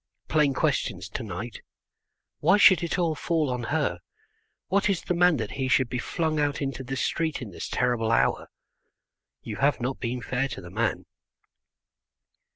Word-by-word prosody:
Plain 150 Hz, -4 st, +2 dB
questions 115 Hz, -, 0 dB
to 115 Hz, -, -5 dB
night. 110 Hz, +2 st, -6 dB, 0.8 s
"Why 205 Hz, -, +4 dB
should 190 Hz, -3 st, +7 dB
it 170 Hz, -, -1 dB
all 170 Hz, -3 st, +1 dB
fall 155 Hz, -2 st, 0 dB
on 125 Hz, -1 st, -3 dB
her? 125 Hz, -, 0 dB, 0.7 s
What 200 Hz, +2 st, +2 dB
is 190 Hz, -4 st, 0 dB
the -, -, -1 dB
man 175 Hz, -2 st, +4 dB
that 115 Hz, -, -4 dB
he 130 Hz, -1 st, -2 dB
should 130 Hz, -1 st, +3 dB
be 125 Hz, -, -2 dB
flung 155 Hz, +3 st, -1 dB
out 145 Hz, 0 st, 0 dB
into 135 Hz, -2 st, -3 dB
the 135 Hz, +2 st, -4 dB
street 160 Hz, +3 st, -1 dB
in 120 Hz, -6 st, -7 dB
this -, -, -6 dB
terrible 120 Hz, -2 st, +1 dB
hour? -, -, +2 dB, 0.9 s
You 105 Hz, -2 st, -6 dB
have 140 Hz, 0 st, +2 dB
not 130 Hz, +2 st, -3 dB
been 125 Hz, +1 st, -2 dB
fair 130 Hz, +2 st, -1 dB
to -, -, -7 dB
the 85 Hz, -1 st, -11 dB
man." 110 Hz, +2 st, -1 dB
135 Hz, 170 wpm, -26 LUFS, 120-160 Hz, 0.9 s, should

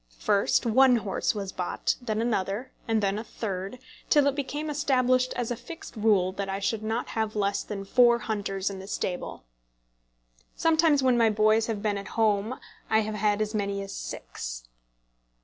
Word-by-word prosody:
First 200 Hz, -, +2 dB
one 255 Hz, +2 st, +5 dB
horse 215 Hz, -1 st, -1 dB
was 200 Hz, -2 st, -4 dB
bought, 180 Hz, -1 st, -1 dB
then 220 Hz, -2 st, -1 dB
another, 220 Hz, +2 st, -1 dB, 0.2 s
and 220 Hz, -2 st, +1 dB
then 200 Hz, +1 st, +1 dB
a -, -, -5 dB
third, 195 Hz, -1 st, -5 dB, 0.3 s
till 290 Hz, -2 st, +5 dB
it 280 Hz, -, +3 dB
became 290 Hz, +2 st, -3 dB
established 255 Hz, -3 st, +2 dB
as 245 Hz, -1 st, -2 dB
a -, -, 0 dB
fixed 250 Hz, +8 st, -10 dB
rule 205 Hz, -4 st, +3 dB
that 195 Hz, +1 st, -4 dB
I 195 Hz, -, -1 dB
should 205 Hz, +2 st, -1 dB
not 225 Hz, +3 st, -2 dB
have 220 Hz, -1 st, -2 dB
less 200 Hz, -1 st, 0 dB
than 200 Hz, -2 st, -6 dB
four 240 Hz, +3 st, +5 dB
hunters 200 Hz, -3 st, -2 dB
in 195 Hz, -, -7 dB
the 190 Hz, -, -9 dB
stable. 180 Hz, -, -4 dB, 1.1 s
Sometimes 315 Hz, -3 st, +3 dB
when 250 Hz, -2 st, +4 dB
my 230 Hz, -1 st, +5 dB
boys 215 Hz, +1 st, +3 dB
have 215 Hz, -3 st, -3 dB
been 205 Hz, -2 st, 0 dB
at 200 Hz, -, -8 dB
home 220 Hz, +2 st, +1 dB, 0.3 s
I 220 Hz, 0 st, +4 dB
have 215 Hz, 0 st, -3 dB
had 210 Hz, 0 st, +1 dB
as 215 Hz, +1 st, -5 dB
many 200 Hz, -1 st, -1 dB
as 195 Hz, -, -8 dB
six. -, -, -6 dB
215 Hz, 180 wpm, -27 LUFS, 200-245 Hz, 1.1 s, one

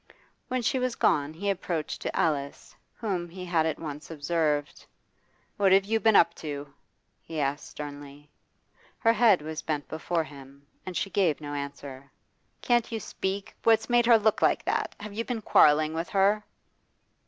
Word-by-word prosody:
When 255 Hz, -1 st, -2 dB
she 260 Hz, +3 st, +1 dB
was 255 Hz, -1 st, -1 dB
gone 145 Hz, 0 st, +2 dB
he 175 Hz, +6 st, -6 dB
approached 175 Hz, -4 st, -3 dB
to -, -, -4 dB
Alice, 140 Hz, -3 st, -2 dB, 0.2 s
whom 185 Hz, -6 st, -3 dB
he 180 Hz, +2 st, -8 dB
had 165 Hz, -3 st, +1 dB
at 160 Hz, -, -2 dB
once 150 Hz, -1 st, -7 dB
observed: 150 Hz, -1 st, -1 dB, 0.7 s
'What 195 Hz, -2 st, +3 dB
have 195 Hz, +1 st, +5 dB
you 225 Hz, +2 st, +1 dB
been 220 Hz, -1 st, +4 dB
up 170 Hz, -2 st, +6 dB
to?' 145 Hz, -3 st, -7 dB, 0.5 s
he 160 Hz, -1 st, -6 dB
asked 145 Hz, +1 st, -1 dB
sternly. 145 Hz, 0 st, -9 dB, 0.7 s
Her 230 Hz, -2 st, +3 dB
head 215 Hz, -8 st, +4 dB
was 155 Hz, 0 st, -5 dB
bent 150 Hz, -2 st, -3 dB
before 165 Hz, +1 st, -2 dB
him, 140 Hz, -1 st, -14 dB, 0.2 s
and 185 Hz, -, -3 dB
she 195 Hz, -, -2 dB
gave 175 Hz, -5 st, +2 dB
no 145 Hz, -1 st, -6 dB
answer. 140 Hz, -1 st, -7 dB, 0.5 s
'Can't 240 Hz, -1 st, +2 dB
you 225 Hz, -, -2 dB
speak? 195 Hz, +1 st, -4 dB
What's 225 Hz, +1 st, +3 dB
made 240 Hz, -1 st, +4 dB
her 235 Hz, -2 st, +8 dB
look 220 Hz, 0 st, +1 dB
like -, -, +2 dB
that? -, -, -1 dB
Have 205 Hz, 0 st, -8 dB
you 225 Hz, +3 st, -2 dB
been 230 Hz, -3 st, -4 dB
quarrelling 155 Hz, -1 st, +5 dB
with 165 Hz, +1 st, -3 dB
her? 205 Hz, +1 st, +2 dB
165 Hz, 170 wpm, -27 LUFS, 145-210 Hz, 0.7 s, her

